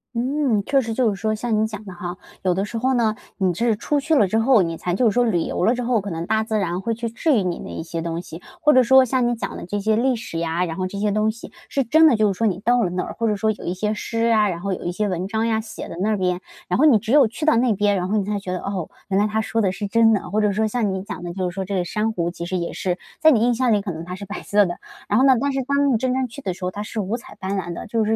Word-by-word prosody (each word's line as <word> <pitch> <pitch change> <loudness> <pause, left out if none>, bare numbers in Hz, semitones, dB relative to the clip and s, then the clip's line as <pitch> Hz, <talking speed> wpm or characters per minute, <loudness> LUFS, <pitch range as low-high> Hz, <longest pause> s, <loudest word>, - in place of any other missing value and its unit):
嗯， 250 -3 +1
确 275 -1 +3
实 225 -2 -4
就 225 -3 +2
是 - - -5
说 215 0 0
像 215 -1 0
你 220 - +2
讲 215 -1 -8
的 190 - -8
哈。 175 +1 -6 0.3
有 185 -1 +2
的 190 +2 -1
时 230 - -5
候 260 +3 +1
呢， 225 -3 +2 0.2
你 185 -3 +1
是 230 +5 +1
出 290 +7 0
去 310 +3 +1
了 210 -9 +4
之 220 +4 +1
后， 235 -1 +5
你 165 -1 -3
才 175 +1 -2
就 245 - +2
是 220 - +5
说 245 - +3
旅 180 -7 +1
游 - - -2
了 235 - +3
之 245 - -3
后， 240 -1 +2
可 200 - -6
能 165 -1 -4
大 220 +3 +1
自 220 0 -1
然 180 -3 -1
会 230 +3 -1
去 230 +1 -3
治 290 +7 +1
愈 205 - +1
你 180 -2 -2
的 - - -8
一 - - -5
些 165 0 -5
东 165 0 -3
西， 170 -1 -10 0.2
或 300 -2 +5
者 255 - +7
说 265 +2 +6
像 255 0 +1
你 240 - 0
讲 230 - -5
的 - - -7
这 205 +4 -3
些 215 +2 +1
历 250 +3 +2
史 220 -7 -5
呀， 165 +1 -1
然 165 -2 -5
后 185 -1 -1
这 200 - -7
些 205 +1 0
东 215 +1 +1
西 230 +1 -7 0.2
是 275 - 0
真 315 +7 +5
的 280 - +5
就 215 -2 +2
是 190 - -6
说 225 - +2
你 190 -3 -1
到 240 +4 +2
了 180 - 0
那 180 +1 -2
儿， - - -6
或 230 - +1
者 210 - +1
说 220 +2 +1
有 215 - -8
一 175 - -1
些 210 +3 -1
诗 230 +2 -1
啊， 215 -2 +4
然 170 -2 -4
后 200 +1 -2
有 - - -6
一 175 - -1
些 210 +4 -1
文 180 0 -2
章 220 +2 -1
呀， 225 -1 +1
写 220 - -8
的 - - -7
那 200 +4 +1
儿 215 - +1
边， 180 -1 0 0.3
然 180 - 0
后 305 - +5
你 280 -7 +7
只 220 +2 -4
有 280 -3 +6
去 245 +8 -5
到 310 - +4
那 240 -1 +3
边， 205 0 +2
然 180 -1 -1
后 210 +3 0
你 205 - +1
才 205 0 -2
觉 190 -2 -6
得， 180 - -2
哦， 190 -5 -4 0.2
原 195 0 +2
来 205 - +3
它 215 +1 0
说 225 +1 -1
的 195 -3 +2
是 205 +2 -4
真 225 +2 +4
的。 - - +4
或 215 +2 +1
者 210 -1 +2
说 215 +2 +1
像 215 -2 0
你 190 0 -4
讲 200 - -7
的 175 -1 -5
就 185 -1 -2
是 - - -9
说 190 +1 -3
这 200 +1 -3
个 180 -2 0
珊 215 +5 -1
瑚 175 -4 -2
其 170 -1 -6
实 185 +1 -2
也 170 -1 -3
是 180 -2 -2 0.2
在 315 - +7
你 240 - +4
印 240 +1 +3
象 245 0 +1
里 205 - +2
可 195 -2 -4
能 160 0 -6
它 180 +2 -6
是 200 - -8
白 205 +1 -6
色 205 0 +3
的， 175 -1 -4 0.3
然 210 - +2
后 265 - +5
呢， 270 - +7
但 280 +3 0
是 270 - 0
当 280 +1 +2
你 - - +3
真 255 +2 0
正 260 0 0
去 265 +5 -10
的 190 -8 -2
时 185 - -11
候， 180 - -1
它 205 - -6
是 215 +1 -5
五 210 +3 -1
彩 235 - -13
斑 190 +1 -3
斓 175 -2 -3
的。 - - -7
就 225 +1 0
是 215 - 0
215 Hz, 370 characters per minute, -22 LUFS, 185-235 Hz, 0.3 s, 者